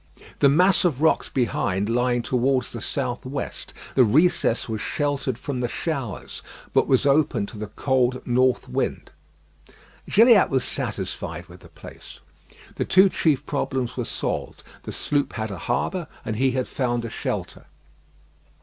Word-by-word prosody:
The 140 - +6
mass 180 +7 +4
of 160 -8 +1
rocks 160 - +3
behind 105 -5 0
lying 120 +1 +1
towards 130 +1 +1
the 115 - -6
south 125 -2 -3
west, 135 +2 -5 0.2
the 130 - +5
recess 135 +1 +2
was 110 -2 -3
sheltered 145 -3 -1
from 130 +1 -4
the 125 - 0
showers, 135 - -4 0.3
but - - +3
was 130 +1 +3
open 140 -6 +2
to 105 - -11
the 105 - -4
cold 130 +2 0
north 125 +1 +2
wind. - - -3 1.0
Gilliatt 225 -1 +6
was 130 -2 +1
satisfied - - -4
with - - -14
the - - -16
place. - - -13 0.6
The - - 0
two 190 +1 +6
chief 155 -6 +1
problems 130 -3 -2
were 125 - -2
solved; - - -4 0.2
the - - -7
sloop 145 -2 -1
had 110 -2 -3
a 95 - -6
harbour, 165 +7 -1 0.2
and 110 - -2
he 130 +4 +2
had 130 -1 -1
found 120 -3 -1
a - - -4
shelter. - - -4
130 Hz, 155 wpm, -24 LUFS, 120-145 Hz, 1.0 s, The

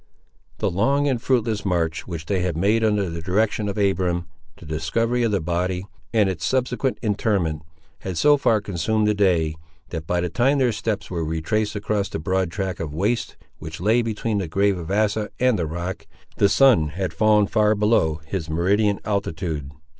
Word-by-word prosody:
The - - 0
long 135 +10 +2
and 130 -4 0
fruitless 115 -5 0
march 85 -4 -1
which 85 -3 -6
they 95 +3 0
had 90 -3 -1
made 105 +6 +2
under 105 -3 +2
the 85 0 -5
direction 105 +3 0
of 100 - -4
Abiram, 90 -3 +1 0.3
the - - -13
discovery 115 +11 -1
of 115 -2 +1
the 100 - +1
body, 90 +2 -2 0.3
and 110 -3 +3
its 95 -4 -3
subsequent 130 0 0
interment, 100 -7 0 0.4
had 95 -3 -5
so 145 0 +5
far 115 -6 +2
consumed 105 +3 0
the 105 - +3
day, 90 -6 +2 0.4
that 80 -2 -6
by 90 - +1
the 90 - 0
time 130 - +2
their 130 -3 +3
steps 105 -1 -3
were 85 -2 -2
retraced 100 +8 -1
across 100 0 -1
the - - -4
broad 95 +2 0
track 95 0 -3
of 75 -3 -5
waste 105 +8 -1 0.2
which 80 +1 -8
lay 110 +6 +3
between 110 -1 -2
the 95 - -3
grave 100 +4 +2
of 85 0 -7
Asa 105 +1 +1
and 125 -5 +3
the 85 - -1
rock, 85 +3 -5 0.3
the 100 - +4
sun 125 - +5
had 90 +3 -4
fallen 105 -1 +4
far 105 +1 +2
below 100 -7 +2
his 80 -1 -4
meridian 100 +6 +2
altitude. 85 -8 -2
100 Hz, 185 wpm, -23 LUFS, 85-110 Hz, 0.4 s, so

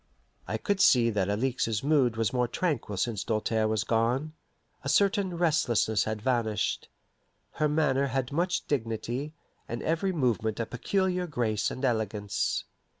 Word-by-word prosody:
I - - -1
could 200 -3 0
see 120 -7 +5
that 100 -2 0
Alixe's 115 0 0
mood 135 -6 +2
was 115 -1 0
more 125 -1 +1
tranquil 120 - -2
since 110 +1 -1
Doltaire 110 0 0
was 110 -1 0
gone. 120 +7 0 0.5
A 140 - -3
certain 195 +2 +2
restlessness 125 - +2
had 110 -1 -4
vanished. 115 -4 0 0.6
Her 150 - 0
manner 140 -3 +2
had 135 0 -2
much 175 +5 0
dignity, 125 +3 -3 0.3
and 120 - -4
every 165 +4 0
movement 120 - 0
a 115 - 0
peculiar 180 - -1
grace 115 -8 0
and 130 - -3
elegance. 105 -4 -1
125 Hz, 145 wpm, -28 LUFS, 110-155 Hz, 0.6 s, see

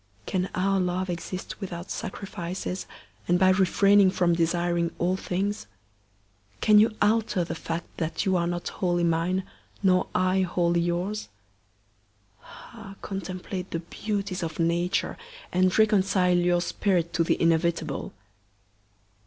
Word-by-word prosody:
can 185 0 -1
our 195 +1 +1
love 180 0 -1
exist 180 +4 -6
without 175 -2 -6
sacrifices, 185 -1 -5 0.4
and 175 - +3
by 185 +1 +5
refraining 195 +1 +5
from 175 -2 +2
desiring 170 0 +1
all 180 +2 +1
things? 195 +3 -2 0.9
Can 210 -1 +6
you 215 +1 +3
alter 215 -3 +2
the 170 - -4
fact 165 +1 -4
that 160 0 -2
you 190 -1 +2
are 170 -1 +1
not 175 0 -3
wholly 175 -2 0
mine, 170 +3 +1 0.4
nor 185 -1 +3
I 185 +1 +2
wholly 175 -1 +1
yours? 175 - -2 1.1
Ah! 220 -4 -12
contemplate 185 -1 -5
the - - -2
beauties 200 +1 -3
of 160 -2 -4
Nature, 170 +3 0 0.3
and 185 0 +2
reconcile 195 -4 +3
your 175 0 +2
spirit 175 -1 0
to 165 - +2
the - - +1
inevitable. 165 -3 0
180 Hz, 130 wpm, -26 LUFS, 170-195 Hz, 1.1 s, Can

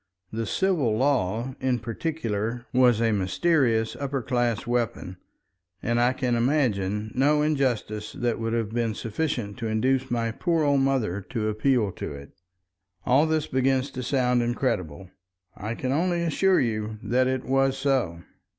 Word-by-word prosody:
The 110 0 -3
civil 155 - +1
law, 125 -2 0
in 130 -1 +1
particular, 115 -2 -3
was 125 -3 +4
a 115 -1 +2
mysterious 115 - +1
upper 140 -2 -3
class 120 -3 0
weapon, 115 -6 -2 0.7
and 120 +1 +1
I 120 +1 +4
can 130 -1 -1
imagine 110 -5 0
no 150 +3 +3
injustice 125 -8 -1
that 120 -1 -1
would 115 0 -2
have 115 -2 -1
been 115 -2 -1
sufficient 115 -3 -3
to 115 - -2
induce 130 +4 +1
my 115 -1 0
poor 165 +6 0
old 140 -1 +3
mother 125 -8 0
to 110 -3 -1
appeal 110 -1 +1
to - - -6
it. 70 0 -10 0.7
All 140 +5 +4
this 155 -1 +1
begins 130 +1 +1
to 130 - -5
sound 125 -1 +1
incredible. 95 - -2 0.4
I 110 +3 -4
can 130 +1 -2
only 170 +4 +1
assure 185 +3 +3
you 110 -2 -2
that 130 +2 +2
it 130 0 -1
was 135 0 +2
so. 130 -12 0
120 Hz, 150 wpm, -26 LUFS, 110-135 Hz, 0.7 s, was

